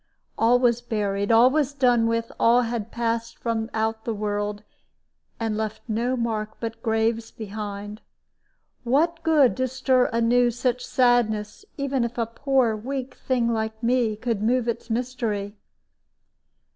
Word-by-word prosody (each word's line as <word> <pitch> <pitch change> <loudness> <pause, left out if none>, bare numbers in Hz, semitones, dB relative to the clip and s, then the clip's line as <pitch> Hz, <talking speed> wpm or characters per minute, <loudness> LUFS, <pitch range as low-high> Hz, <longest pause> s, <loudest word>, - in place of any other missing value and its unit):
All 235 +2 +4
was 240 -1 +2
buried, 205 -3 -1
all 235 +3 +6
was 290 -1 0
done 245 -4 +3
with, 230 0 -1
all 240 +2 +5
had 230 -2 -3
passed 230 -1 -2
from 225 -1 -2
out 220 0 -1
the 230 - -2
world, 205 0 -3 0.8
and 225 -2 -1
left 220 0 -4
no 240 +3 0
mark 220 -2 -2
but 225 -1 -5
graves 225 0 0
behind. 210 0 -7 0.8
What 320 +7 +1
good 305 -6 +4
to 260 0 +1
stir 260 0 +2
anew 240 +1 +3
such 245 +1 -1
sadness, 235 - +1
even 275 -3 0
if 235 +1 -4
a 230 - +1
poor 245 0 +1
weak 260 +4 -5
thing 245 -3 0
like 220 0 -3
me 235 -2 +2
could 225 -1 -2
move 240 +2 +1
its 235 0 -3
mystery? 225 -4 -2
230 Hz, 145 wpm, -24 LUFS, 220-250 Hz, 0.8 s, all